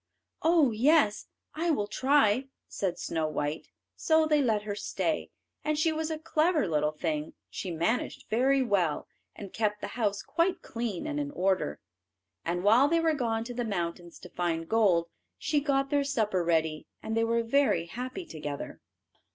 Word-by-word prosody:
"Oh 320 -6 +4
yes, 240 -1 +3 0.3
I 335 +3 -1
will 245 -10 +1
try," 260 +2 +2 0.2
said 185 -3 -2
Snow 160 -2 -1
white. 150 0 -3 0.3
So 320 -1 +3
they 300 -1 +3
let 220 -5 +1
her 210 -1 -3
stay, 200 - -2 0.3
and 305 0 0
she 320 +2 +2
was 315 0 -2
a 315 - -2
clever 315 - +1
little 150 -2 +1
thing. 155 -1 -3 0.2
She 190 - -5
managed 175 +9 -1
very 265 +4 +3
well, 185 -10 0 0.3
and 200 -3 -9
kept 210 -1 0
the - - -5
house 205 -4 -1
quite 350 +2 0
clean 230 -6 -4
and 300 -1 -2
in 290 -1 -2
order. 190 - 0 0.6
And 175 +2 -2
while 230 +7 +6
they 335 +2 +2
were 325 -1 +2
gone 230 -5 -1
to 245 +1 -7
the 245 0 -2
mountains 175 -5 -4
to 180 - -10
find 165 -2 -2
gold, 190 -6 +3 0.3
she 300 - +1
got 275 -1 0
their 285 -1 +3
supper 220 -10 0
ready, 160 -2 0 0.2
and 220 - -3
they 225 - +2
were 230 0 +1
very 230 -8 +2
happy 255 - -6
together. 150 - -6
225 Hz, 170 wpm, -29 LUFS, 175-285 Hz, 0.6 s, while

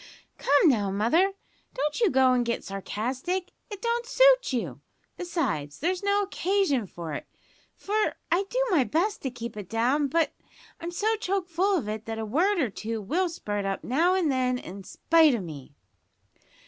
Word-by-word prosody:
"Come 285 +4 +4
now, 210 -9 +3
mother, 275 - +2 0.4
don't 295 +2 -1
you 445 - +5
go 260 -1 +4
an' 250 - +2
get 235 -1 -2
sarcastic. 255 - -3 0.2
It 410 0 -8
don't 470 0 0
suit - - +5
you; 250 -3 -3 0.3
besides, 235 - -2
there's 360 +4 -1
no 405 0 +2
occasion 375 - 0
for 170 -3 -7
it, - - -6 0.5
for 425 +2 -1 0.2
I 365 +4 +2
do - - +1
my 315 -8 +4
best 355 - 0
to 265 - -2
keep 235 -2 -7
it 205 -4 -8
down, 255 +6 +1
but 330 +4 +1 0.5
I'm 335 - -5
so 425 +6 0
choke 390 -3 -2
full 370 +3 +1
of 235 - -3
it 215 +1 -4
that 225 0 -4
a 220 - -3
word 350 - +2
or 265 -10 0
two 220 +4 -4
will 345 - 0
spurt 205 -11 -4
up 195 0 -3
now 335 +9 +2
and 345 -6 +2
then 255 -1 +1
in 195 -4 -9
spite 320 - +3
o' - - -2
me." 150 -6 -9
290 Hz, 180 wpm, -27 LUFS, 225-375 Hz, 0.5 s, you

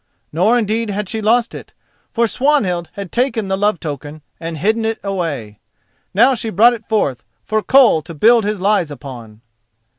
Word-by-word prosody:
Nor 200 +9 +3
indeed 220 0 -1
had 205 0 -3
she 220 +3 -3
lost 230 +2 +2
it, - - -10 0.4
for 235 - +1
Swanhild 220 - 0
had 200 -4 -7
taken 235 -5 -1
the 190 - +1
love 205 -2 0
token 150 0 -7 0.2
and 165 -1 -5
hidden 220 +8 0
it 225 0 -2
away. 160 - -4 0.5
Now 240 +7 +4
she 230 -2 -3
brought 225 +5 +5
it 230 -2 -8
forth 175 - -1 0.2
for 215 0 -1
Koll 250 -10 +4
to 165 +2 -10
build 230 +8 +4
his 210 0 -2
lies 195 -4 +1
upon. 120 -6 -10
205 Hz, 175 wpm, -17 LUFS, 165-225 Hz, 0.5 s, brought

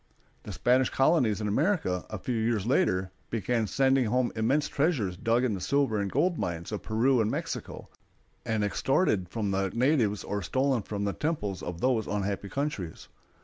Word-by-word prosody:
The - - -8
Spanish 130 +1 +2
colonies 135 - +2
in 105 - -1
America, 110 - 0
a 110 - -4
few 125 +6 -3
years 110 -2 0
later, 95 - +1 0.2
began 115 0 0
sending 135 +2 +2
home 125 +2 +1
immense 135 +7 +1
treasures 140 - 0
dug 115 +6 +1
in 125 -4 +1
the 95 - -4
silver 135 -5 +1
and 100 -1 -2
gold 165 +5 +1
mines 85 +1 -3
of 105 - -3
Peru 120 +3 +2
and 110 - +1
Mexico, - - -5 0.6
and 110 -2 -1
extorted 105 - +1
from 105 -1 -2
the 95 0 0
natives 115 -3 +1
or 100 0 -3
stolen 130 +5 +1
from 100 0 -4
the 100 -1 -1
temples 105 - -2
of 90 -1 -6
those 120 -5 +1
unhappy 100 0 -2
countries. 120 - -4
110 Hz, 175 wpm, -28 LUFS, 100-135 Hz, 0.6 s, Spanish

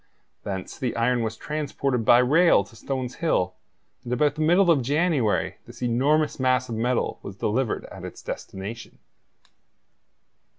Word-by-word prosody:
Thence 95 -2 -5
the 125 -4 -2
iron 120 +1 +1
was 110 -1 -3
transported 140 -4 -2
by 120 - +6
rail 145 - +5
to 100 +3 -18
Stones 130 +1 -4
Hill, 155 - +1 0.5
and 120 - -7
about 145 +3 +2
the 155 - -5
middle 175 +3 +5
of 145 -5 +3
January 145 - +1
this - - -9
enormous 140 +7 +1
mass 130 -1 +1
of - - -3
metal 120 +2 -1
was 95 - -8
delivered 110 +4 -1
at - - -11
its - - -9
destination. 100 +5 -7
125 Hz, 145 wpm, -25 LUFS, 115-150 Hz, 0.5 s, by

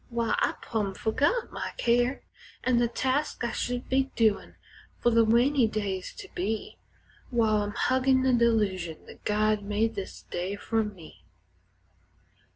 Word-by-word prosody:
Why, 235 -1 0
I've - - 0
plumb 205 -4 -2
fergot 290 - 0
my - - -5
care 245 +2 +1 0.4
An' 255 -2 +2
the 240 - +3
tasks 260 +2 -1
I 235 - -1
should 245 0 -3
be 265 +1 +1
doin' 220 -3 +1 0.4
fer 240 - +3
the 230 0 +5
rainy 240 +3 +4
days 200 -4 -3
to - - -9
be, 210 +5 -3 0.5
While 225 -3 +2
I'm 205 0 -3
huggin' 260 0 +2
the 260 -1 +3
delusion 205 -9 +1
that - - -14
God 215 0 +2
made 210 +2 0
this 195 - -7
day 180 +3 -4
fer 225 +2 0
me. 195 -7 -10
225 Hz, 150 wpm, -28 LUFS, 205-245 Hz, 0.5 s, the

